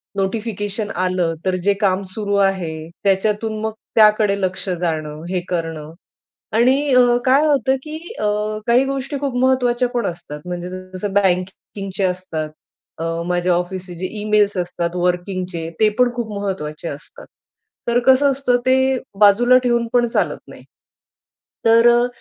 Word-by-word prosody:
Notification 205 +1 -2
आलं 180 -2 0
तर 185 -1 +1
जे 200 - +4
काम 190 -1 +2
सुरू 205 0 -2
आहे, 175 -5 0
त्याच्यातून 210 +2 0
मग 220 0 -1 0.2
त्याकडे 210 -2 +4
लक्ष 185 +1 -1
जाणं. 160 -3 -3
हे 185 -1 0
करणं. 165 -3 -4 0.6
आणि 260 +5 +3
अ, 245 -1 +5
काय 275 +4 +4
होतं 270 -3 +2
की 305 +1 -7 0.2
अ, - - -1 0.4
काही 245 +3 +4
गोष्टी 275 +1 -3
खूप 275 -3 -2
महत्त्वाच्या 250 -1 +2
पण 240 - 0
असतात, 160 -4 -6
म्हणजे 175 0 -4
जसं 185 +2 -6
बँकिंगचे 195 +1 -1
असतात, 180 -4 -2 0.5
अ, 165 - -3 0.2
माझ्या 180 0 +1
ऑफिसचे 180 +1 -3
जे 185 - -2
ईमेल्स 210 -1 +2
असतात 175 0 -2
वर्किंगचे, 180 -1 -2
ते 215 - +6
पण 250 -1 +4
खूप 235 -3 -4
महत्त्वाचे 170 -6 -4
असतात. 145 0 -9 0.6
तर 235 +1 +3
कसं 270 +2 +5
असतं 260 -2 +1
ते 260 0 +5 0.4
बाजूला 240 +5 +6
ठेवून 235 -1 +1
पण 245 -1 +3
चालत 230 - 0
नाही. - - -12 1.0
तर 230 +1 +6
अ, 240 +1 +4
200 Hz, 145 wpm, -20 LUFS, 180-240 Hz, 1.0 s, ते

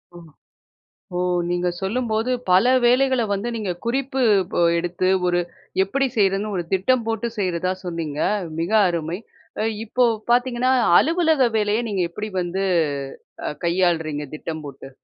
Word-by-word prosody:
ஓ, - - -10 1.0
ஓ! - - 0 0.3
நீங்க 175 0 0
சொல்லும்போது 225 +3 -1 0.2
பல 185 +5 +5 0.2
வேலைகள 255 0 +3
வந்து 200 +4 -2
நீங்க 210 -5 -2
குறிப்பு 265 +2 -1 0.3
ப - - 0 0.2
எடுத்து 175 +2 -1 0.2
ஒரு 175 0 +2 0.4
எப்படி 275 +8 0
செய்றதுன்னு 200 +1 +1
ஒரு 175 - -1
திட்டம் 230 +6 +2
போட்டு 225 +1 -1
செய்றதா 185 -1 0
சொன்னீங்க. 165 -4 -4 0.4
மிக 170 +4 -2 0.2
அருமை. 170 0 -3 0.7
இப்போ 250 +3 +2 0.3
பாத்தீங்கன்னா, 245 +1 +2 0.3
அலுவலக 320 -3 +2
வேலையை 210 +1 +1
அ - - -3
நீங்க 195 -3 0
எப்படி 210 +4 -5
வந்து 180 +2 -2 0.8
அ - - 0 0.2
கையாளுறீங்க 165 -4 0
திட்டம் 160 0 -6
போட்டு? 135 -1 -10
195 Hz, 130 wpm, -22 LUFS, 175-240 Hz, 1.0 s, பல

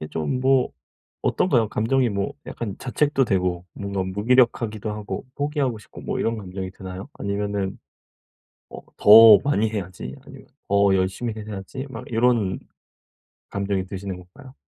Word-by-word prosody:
이게 75 - -6
좀 80 - -2
뭐 130 -1 +3 0.5
어떤가요? 120 - +2
감정이 120 +3 +1
뭐 100 -1 -2
약간 105 -5 -5
자책도 135 +1 +1
되고 90 -4 0
뭔가 100 -1 -3
무기력하기도 110 +1 +1
하고 105 +3 -5
포기하고 145 -5 -1
싶고 - - -13
뭐 - - -3
이런 115 0 0
감정이 95 -2 -6
드나요? 95 +4 -8
아니면은 100 -1 -3 0.9
어 - - -8 0.2
'더 110 0 +9
많이 110 -6 +1
해야지.' 95 - -5
아니면 - - -13 0.2
'더 100 -1 +4
열심히 95 +5 -1
해야지.' 110 +5 -7
막 120 -4 -8
요런 115 -5 +2 0.9
감정이 100 -1 -2
드시는 95 0 -6
건가요? 130 +10 -15
105 Hz, 315 characters per minute, -23 LUFS, 95-120 Hz, 0.9 s, 더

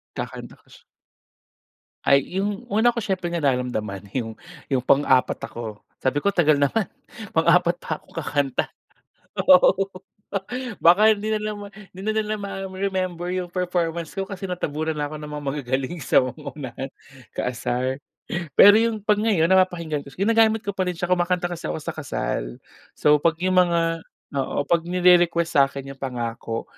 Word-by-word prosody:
Kakanta - - -6
pa - - -29
siya. - - -17 1.2
Ay 140 +7 +3
'yung 205 +3 -2
una 225 +3 +3
ko 235 - -2
siyempre 190 -3 -2
nararamdaman 125 - -1
'yung 115 -4 -2 0.4
'yung 135 - +3
pang-apat 135 -1 +3
ako 110 -3 -8 0.2
sabi 145 +2 0
ko, 200 - +3
"Tagal 160 -6 +4
naman 145 +9 +1 0.5
pang-apat 170 +1 +4
pa 160 -3 -5
ako - - -30
kakanta," 145 -4 -1 0.6
oo, 185 +1 +5 1.0
baka 205 +6 +6
hindi 210 0 -1
na - - -1
nila 215 - -1 0.4
hindi 190 - -10
na 215 - +3
nila 215 -1 0
ma-remember 190 -2 -3
'yung 180 -1 -3
performance 170 -2 -2
ko 195 - -1
kasi 195 0 -6
natabunan 160 -3 -2
na 145 0 -3
ako 155 - -6
ng 150 - -7
mga 150 0 -5
magagaling 135 +3 -3
sa 130 - +3
unahan, 135 -1 -6 0.5
kaasar. 125 +2 -2 0.6
Pero 205 +1 +9
'yung 225 -2 0
'pag 210 0 +2
ngayon 195 -6 +2
napapakinggan 170 -6 +1
ko 140 - -13
ginagamit 220 +2 +3
ko 200 - -2
pa 190 -2 -2
rin 180 - -2
siya, 175 +2 -3
kumakanta 175 0 +1
kasi 170 -1 -5
ako - - -3
sa 165 - -3
kasal. - - -3 0.4
So, 150 0 +4
'pag 165 +2 +2
'yung 185 0 +2
mga, 165 -2 +1 0.4
oo, 135 +1 -1
'pag 170 -1 +2
nire-request 175 -2 +3
sa'kin 135 0 +1
'yung 135 - -13
pangako, 115 -3 -4
170 Hz, 155 wpm, -23 LUFS, 140-190 Hz, 1.2 s, Pero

